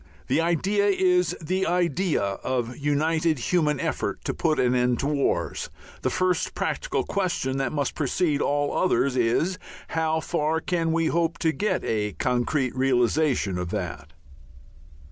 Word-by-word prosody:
The -, -, +3 dB
idea 190 Hz, +5 st, +1 dB
is 180 Hz, -3 st, +2 dB
the 185 Hz, +4 st, -1 dB
idea 175 Hz, -, +1 dB
of 120 Hz, +5 st, -2 dB
united 155 Hz, +2 st, +1 dB
human 150 Hz, +2 st, +1 dB
effort -, -, -3 dB
to -, -, -1 dB
put 155 Hz, -1 st, 0 dB
an 125 Hz, 0 st, +3 dB
end 125 Hz, -1 st, +2 dB
to -, -, -2 dB
wars; 145 Hz, -1 st, -1 dB, 0.3 s
the -, -, 0 dB
first 185 Hz, 0 st, 0 dB
practical -, -, -1 dB
question, 175 Hz, -9 st, -1 dB
that 135 Hz, -2 st, -1 dB
must 145 Hz, -2 st, -1 dB
precede 150 Hz, +1 st, 0 dB
all 145 Hz, 0 st, 0 dB
others, 140 Hz, -7 st, +2 dB
is 130 Hz, +10 st, +1 dB, 0.3 s
how 160 Hz, 0 st, 0 dB
far 160 Hz, 0 st, 0 dB
can 165 Hz, -1 st, -1 dB
we 165 Hz, 0 st, +1 dB
hope 165 Hz, 0 st, 0 dB
to 160 Hz, -, +1 dB
get 210 Hz, +6 st, -1 dB
to -, -, -5 dB
a 105 Hz, -2 st, -1 dB
concrete 125 Hz, -, 0 dB
realization 130 Hz, -, +1 dB
of 90 Hz, -1 st, -3 dB
that? 75 Hz, -2 st, -5 dB
155 Hz, 150 wpm, -25 LUFS, 130-175 Hz, 0.3 s, The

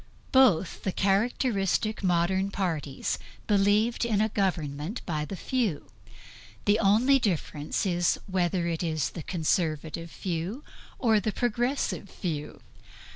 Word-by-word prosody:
Both 235 Hz, -, +4 dB
the 190 Hz, -, -1 dB
characteristic 205 Hz, +1 st, +1 dB
modern 185 Hz, +2 st, +2 dB
parties 165 Hz, -8 st, -2 dB, 0.3 s
believed 210 Hz, +3 st, +3 dB
in 225 Hz, -4 st, +1 dB
a 215 Hz, +1 st, +2 dB
government 170 Hz, -, -2 dB
by 155 Hz, -3 st, -2 dB
the 195 Hz, -, -6 dB
few; 220 Hz, -, -2 dB, 0.7 s
the 205 Hz, +2 st, +4 dB
only 230 Hz, +7 st, +4 dB
difference 160 Hz, -, -1 dB
is 175 Hz, -2 st, +1 dB
whether 180 Hz, -2 st, 0 dB
it 165 Hz, -1 st, -2 dB
is 155 Hz, -4 st, -1 dB
the 170 Hz, -, -6 dB
Conservative 160 Hz, -1 st, -1 dB
few 185 Hz, -, -4 dB, 0.3 s
or 220 Hz, -5 st, +3 dB
Progressive 240 Hz, +1 st, -1 dB
few. 155 Hz, -6 st, -5 dB
190 Hz, 115 wpm, -28 LUFS, 165-215 Hz, 0.7 s, Both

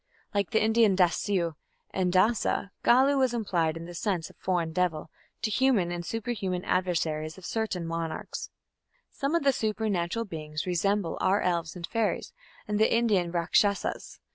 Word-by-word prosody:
Like 200 Hz, -2 st, 0 dB
the 220 Hz, -2 st, +2 dB
Indian 220 Hz, -2 st, +4 dB
"Dasyu" 180 Hz, -1 st, +1 dB, 0.4 s
and 185 Hz, -2 st, 0 dB
"Dasa", 200 Hz, +1 st, +2 dB
Gallu 270 Hz, +3 st, +5 dB
was 255 Hz, -2 st, +2 dB
applied 170 Hz, -8 st, 0 dB
in 165 Hz, -, -7 dB
the 175 Hz, -, -9 dB
sense 175 Hz, -2 st, -2 dB
of -, -, -25 dB
"foreign 175 Hz, -3 st, -1 dB
devil" 165 Hz, -3 st, -1 dB, 0.3 s
to 215 Hz, -, 0 dB
human 230 Hz, -9 st, +2 dB
and 175 Hz, 0 st, -3 dB
superhuman 205 Hz, -3 st, -3 dB
adversaries 160 Hz, -3 st, -1 dB
of 190 Hz, -, -11 dB
certain 215 Hz, -6 st, -2 dB
monarchs. 165 Hz, -1 st, -4 dB, 0.6 s
Some 280 Hz, +3 st, -1 dB
of 335 Hz, -, +1 dB
the 275 Hz, -1 st, +4 dB
supernatural 215 Hz, -2 st, -1 dB
beings 155 Hz, -4 st, -5 dB
resemble 185 Hz, 0 st, 0 dB
our 190 Hz, +2 st, +3 dB
elves 170 Hz, -2 st, -1 dB
and 175 Hz, -1 st, -5 dB
fairies 225 Hz, +2 st, -1 dB, 0.3 s
and 210 Hz, 0 st, -1 dB
the 220 Hz, -, +4 dB
Indian 210 Hz, -7 st, +2 dB
Rakshasas. 190 Hz, +4 st, 0 dB
185 Hz, 155 wpm, -28 LUFS, 170-220 Hz, 0.6 s, Gallu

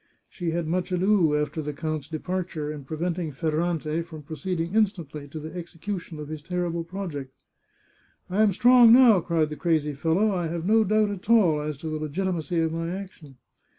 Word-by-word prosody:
She 175 Hz, -2 st, -4 dB
had 170 Hz, 0 st, -1 dB
much 180 Hz, +3 st, -1 dB
ado, 180 Hz, -4 st, +3 dB
after 150 Hz, +1 st, -2 dB
the 150 Hz, 0 st, -4 dB
count's 155 Hz, -1 st, -4 dB
de 160 Hz, 0 st, -4 dB
parture, 170 Hz, -4 st, -3 dB
in 145 Hz, -3 st, -9 dB
preventing 165 Hz, +2 st, -3 dB
Ferrante 160 Hz, +2 st, -1 dB
from 160 Hz, -3 st, -10 dB
proceeding 170 Hz, +3 st, -3 dB
instantly 170 Hz, -9 st, -1 dB
to 155 Hz, +3 st, -7 dB
the 155 Hz, +1 st, -8 dB
execution 175 Hz, 0 st, -6 dB
of 150 Hz, -1 st, -7 dB
his 155 Hz, 0 st, -6 dB
terrible 170 Hz, 0 st, -2 dB
project. 165 Hz, -7 st, -7 dB, 0.4 s
" -, -, -36 dB, 0.3 s
I 195 Hz, +4 st, 0 dB
am 215 Hz, -2 st, +5 dB
strong 240 Hz, +3 st, +7 dB
now," 240 Hz, -5 st, +7 dB
cried 160 Hz, -3 st, 0 dB
the 150 Hz, -, -5 dB
crazy 150 Hz, -1 st, +1 dB
fellow. 165 Hz, +9 st, +1 dB
" -, -, -1 dB
I 175 Hz, -3 st, -1 dB
have 165 Hz, +1 st, -4 dB
no 220 Hz, +3 st, +4 dB
doubt 215 Hz, 0 st, +2 dB
at 200 Hz, +1 st, -8 dB
all 180 Hz, -10 st, +4 dB
as 150 Hz, -1 st, -4 dB
to 160 Hz, -, -7 dB
the 155 Hz, 0 st, -3 dB
legitimacy 170 Hz, +2 st, -2 dB
of 160 Hz, 0 st, 0 dB
my 165 Hz, 0 st, -3 dB
action." 180 Hz, -7 st, -8 dB
165 Hz, 195 wpm, -26 LUFS, 155-185 Hz, 0.4 s, strong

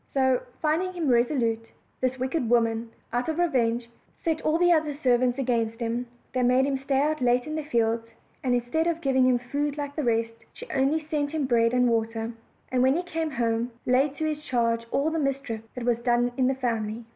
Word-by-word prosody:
So, 260 Hz, -2 st, +3 dB, 0.2 s
finding 335 Hz, +4 st, +1 dB
him 335 Hz, -5 st, -1 dB
resolute, 235 Hz, -2 st, +2 dB, 0.4 s
this 255 Hz, 0 st, 0 dB
wicked 260 Hz, -1 st, -1 dB
woman, 230 Hz, -1 st, +2 dB, 0.2 s
out 245 Hz, +4 st, 0 dB
of 320 Hz, -, -2 dB
revenge, 245 Hz, -9 st, +1 dB, 0.4 s
set 320 Hz, -2 st, 0 dB
all 310 Hz, +1 st, +2 dB
the 350 Hz, 0 st, +5 dB
other 305 Hz, -3 st, +1 dB
servants 250 Hz, -2 st, +2 dB
against 230 Hz, -3 st, 0 dB
him; 235 Hz, +1 st, -2 dB, 0.3 s
they 255 Hz, -, +1 dB
made 250 Hz, +2 st, +4 dB
him 275 Hz, -1 st, -1 dB
stay 270 Hz, 0 st, 0 dB
out 305 Hz, 0 st, +1 dB
late 245 Hz, 0 st, +2 dB
in 305 Hz, -, -5 dB
the 310 Hz, -, -1 dB
fields, 230 Hz, -4 st, 0 dB, 0.4 s
and 250 Hz, -2 st, +2 dB
instead 245 Hz, +8 st, 0 dB
of 335 Hz, -1 st, 0 dB
giv 275 Hz, -5 st, 0 dB
ing 260 Hz, -1 st, +5 dB
him 250 Hz, -1 st, +4 dB
food 285 Hz, +4 st, -2 dB
like 285 Hz, -1 st, -4 dB
the 305 Hz, -, -1 dB
rest, 230 Hz, -1 st, +1 dB, 0.2 s
she -, -, -9 dB
only 270 Hz, +4 st, +2 dB
sent 295 Hz, -2 st, -1 dB
him 310 Hz, -3 st, 0 dB
bread 230 Hz, -2 st, +3 dB
and 250 Hz, 0 st, +3 dB
water, 225 Hz, 0 st, -1 dB, 0.4 s
and, 255 Hz, -1 st, +2 dB
when 260 Hz, +2 st, +4 dB
he 355 Hz, -, -1 dB
came 325 Hz, -2 st, -2 dB
home, 235 Hz, -3 st, -1 dB
laid 270 Hz, +3 st, +2 dB
to 315 Hz, -, -2 dB
his 305 Hz, -1 st, -2 dB
charge 230 Hz, -3 st, 0 dB
all 295 Hz, +6 st, +1 dB
the 325 Hz, -, -1 dB
mischief 275 Hz, -6 st, -2 dB
that 250 Hz, -2 st, -4 dB
was 240 Hz, -1 st, +2 dB
done 240 Hz, 0 st, +2 dB
in 255 Hz, -1 st, +2 dB
the 265 Hz, -, +1 dB
family. 230 Hz, -3 st, -2 dB
255 Hz, 215 wpm, -26 LUFS, 235-290 Hz, 0.4 s, the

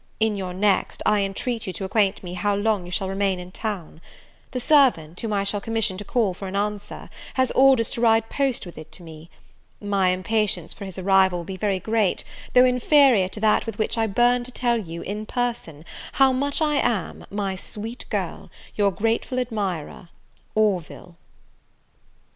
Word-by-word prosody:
In 220 Hz, -1 st, +2 dB
your 190 Hz, -2 st, -4 dB
next 200 Hz, 0 st, +1 dB
I 210 Hz, -1 st, +3 dB
intreat 205 Hz, +4 st, -2 dB
you 185 Hz, -, -3 dB
to 175 Hz, -, -6 dB
acquaint 195 Hz, 0 st, +1 dB
me 180 Hz, -1 st, -6 dB
how 200 Hz, +3 st, 0 dB
long 205 Hz, -3 st, 0 dB
you -, -, -9 dB
shall 190 Hz, +1 st, -1 dB
remain 195 Hz, 0 st, 0 dB
in 180 Hz, 0 st, -9 dB
town. 185 Hz, -7 st, -5 dB, 0.5 s
The 250 Hz, -, -3 dB
servant, 240 Hz, -, +3 dB
whom 225 Hz, -, -3 dB
I 200 Hz, -1 st, +1 dB
shall 200 Hz, +1 st, -2 dB
commission 225 Hz, -3 st, -1 dB
to -, -, -5 dB
call 230 Hz, -7 st, 0 dB
for 195 Hz, +2 st, -7 dB
an 190 Hz, -, -5 dB
answer, 205 Hz, 0 st, -3 dB, 0.3 s
has 260 Hz, -1 st, +2 dB
orders 265 Hz, -4 st, +4 dB
to 235 Hz, -, -4 dB
ride 225 Hz, -1 st, +4 dB
post 270 Hz, -4 st, -1 dB
with 175 Hz, -3 st, -10 dB
it 155 Hz, -, -12 dB
to 180 Hz, -, -11 dB
me. 160 Hz, 0 st, -12 dB, 0.5 s
My 200 Hz, -2 st, +1 dB
impatience 210 Hz, +3 st, -1 dB
for 200 Hz, -, -8 dB
his 190 Hz, -1 st, -6 dB
arrival 190 Hz, -1 st, +3 dB
will 170 Hz, -, -5 dB
be 190 Hz, -, -6 dB
very 195 Hz, 0 st, 0 dB
great, 220 Hz, -1 st, 0 dB, 0.3 s
though 250 Hz, 0 st, +8 dB
inferior 250 Hz, -4 st, +4 dB
to 190 Hz, -, -8 dB
that 220 Hz, +1 st, +3 dB
with 225 Hz, -2 st, -5 dB
which 215 Hz, -, -1 dB
I 225 Hz, -1 st, +1 dB
burn 240 Hz, +4 st, +3 dB
to 255 Hz, -, -9 dB
tell 240 Hz, -2 st, +1 dB
you, 170 Hz, -5 st, -7 dB
in 210 Hz, +2 st, -5 dB
person, 230 Hz, -, -3 dB, 0.3 s
how 270 Hz, -1 st, +4 dB
much 285 Hz, +4 st, 0 dB
I 300 Hz, -1 st, +1 dB
am, 220 Hz, -9 st, -1 dB
my 200 Hz, -2 st, -2 dB
sweet 220 Hz, +5 st, -7 dB
girl, -, -, -3 dB, 0.3 s
your 205 Hz, -1 st, +3 dB
grateful 225 Hz, +6 st, -1 dB
admirer, 195 Hz, -9 st, -3 dB, 0.5 s
"ORVILLE." 190 Hz, -4 st, -1 dB
205 Hz, 185 wpm, -24 LUFS, 190-230 Hz, 0.5 s, though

